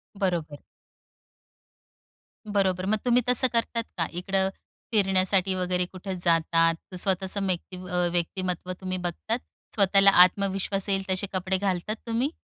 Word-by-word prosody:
बरोबर. 170 -7 -2 1.9
बरोबर, 190 -3 0
मग 215 +2 +1
तुम्ही 245 0 +4
तसं 250 +1 +4
करतात 230 0 0
का? 165 - +1
इकडं 190 +2 0 0.4
फिरण्यासाठी 190 -2 +2
वगैरे 180 0 0
कुठे 190 0 -6
जातात? 165 -1 +2 0.2
स्वतःचं 190 +2 -1
मेकती 185 0 -3
अ, 180 -1 +1
व्यक्तिमत्व 180 +1 -2
तुम्ही 185 0 -3
बघतात, 180 +7 -3 0.4
स्वतःला 195 -1 +5
आत्मविश्वास 195 +1 -1
येईल 195 0 +1
तसे 185 +1 0
कपडे 185 0 0
घालतात 195 +2 -1
तुम्ही? 235 +5 0
190 Hz, 120 wpm, -26 LUFS, 180-200 Hz, 1.9 s, स्वतःला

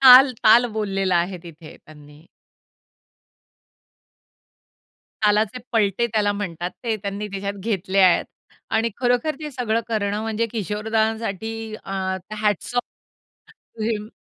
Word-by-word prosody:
ताल-ताल 250 -3 +8
बोललेला 195 -4 0
आहे 180 +2 -1
तिथे 165 -2 -12
त्यांनी. 150 +1 -16 3.0
तालाचे 210 +3 +2
पलटे 215 +1 +2
त्याला 210 -3 +1
म्हणतात. 180 -4 -4
ते 225 -2 0
त्यांनी 200 0 -4
तिच्यात 200 0 -3
घेतले 195 -1 -2
आहेत 185 -2 +5 0.5
आणि 225 +1 +1
खरोखर 245 +5 +2
ते 300 -1 -5
सगळं 235 -4 0
करणं 210 -2 -1
म्हणजे 225 +1 -1
किशोर 210 -1 -3
दादांसाठी 220 0 -1
अ, - - -8 0.4
हॅट्स 210 +2 -1
ऑफ 245 - +2 0.9
टू 220 - -5
हिम. 215 -2 -2
215 Hz, 115 wpm, -23 LUFS, 195-225 Hz, 3.0 s, ताल-ताल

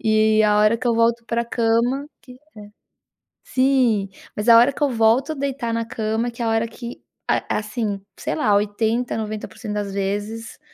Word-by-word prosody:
e 215 0 +3
a 210 0 +3
hora 215 +2 +4
que 250 - -4
eu 235 - +2
volto 230 +1 +2
pra 235 0 -1
cama, 235 +4 0
que 250 - -13
é - - -16 1.1
sim, 255 -7 +2 0.3
mas 210 +3 0
a 230 - +9
hora 245 +4 +5
que - - -11
eu 285 - +3
volto 230 +5 +2
a - - -10
deitar 270 -4 -3
na 230 0 -1
cama, 225 +1 -2
que 235 - -9
é - - 0
a - - +1
hora 225 0 +1
que, 235 +1 -9 0.3
a - - 0
assim 215 -2 -3 0.2
sei - - -3
lá, 215 -9 +2
80 220 +4 0
90% 215 0 -5
das 205 -1 -3
vezes 205 +3 -4
230 Hz, 190 wpm, -22 LUFS, 215-240 Hz, 1.1 s, a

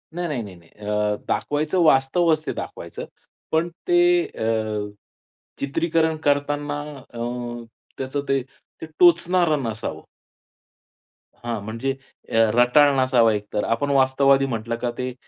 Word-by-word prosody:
नाही, 175 -1 -2
नाही, 135 -6 -2
नाही, 95 -3 -10
नाही. 85 -1 -21
अ, 105 0 -1
दाखवायचं 150 +5 -1
वास्तवच 155 +3 +3
ते - - -2
दाखवायचं. - - -7 0.5
पण 165 +2 +1 0.2
ते 350 0 +4
अ, 110 - -6 1.1
चित्रीकरण 160 +3 0
करताना 145 0 0 0.3
अ, - - -9 0.8
त्याचं 135 +2 -3
ते, 135 -1 +2
ते 135 +4 -15
टोचणारं 170 -3 +4
नसावं. 110 -2 -4 1.3
हां, 120 -2 -4
म्हणजे 115 +5 -3 0.4
अ, - - -9 0.2
रटाळ 125 +4 +5
नसावा 120 -4 +4
एकतर. 105 0 -3
आपण 115 +5 -1
वास्तववादी 135 0 +4
म्हटलं 115 -2 -3
का 120 -1 -1
ते 125 0 -3
135 Hz, 120 wpm, -23 LUFS, 115-155 Hz, 1.3 s, रटाळ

